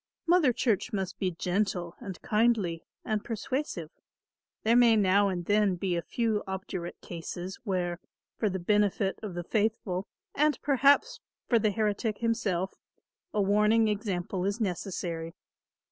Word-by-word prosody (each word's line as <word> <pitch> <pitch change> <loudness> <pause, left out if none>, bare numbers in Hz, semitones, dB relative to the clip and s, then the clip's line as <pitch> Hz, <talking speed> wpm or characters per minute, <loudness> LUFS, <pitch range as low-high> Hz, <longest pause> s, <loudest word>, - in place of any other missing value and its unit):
Mother 340 -6 +5
Church 235 0 0
must 195 -4 -3
be 190 - +1
gentle 180 0 -1
and 190 -3 -7
kindly 210 -7 +1 0.2
and 215 -2 -1
persuasive. 225 - -3 0.7
There 225 +2 +4
may 240 -2 +6
now 200 -1 +4
and 175 -2 -3
then 205 -1 +3
be 180 0 -1
a 170 - 0
few 220 +1 0
obdurate 190 -2 -5
cases 175 +2 -6
where, 180 -3 -1 0.4
for 215 - 0
the 190 - -2
benefit 200 +1 +1
of 200 -5 -6
the 175 - -3
faithful 205 -2 -1 0.3
and 300 0 +2
perhaps 285 - +4 0.3
for 235 - +4
the 215 - +2
heretic 210 0 0
himself, 195 -5 0 0.6
a 210 - +1
warning 210 +3 +4
example 195 -3 -2
is 200 +4 -1
necessary. 175 -4 -3
205 Hz, 140 wpm, -29 LUFS, 180-225 Hz, 0.7 s, may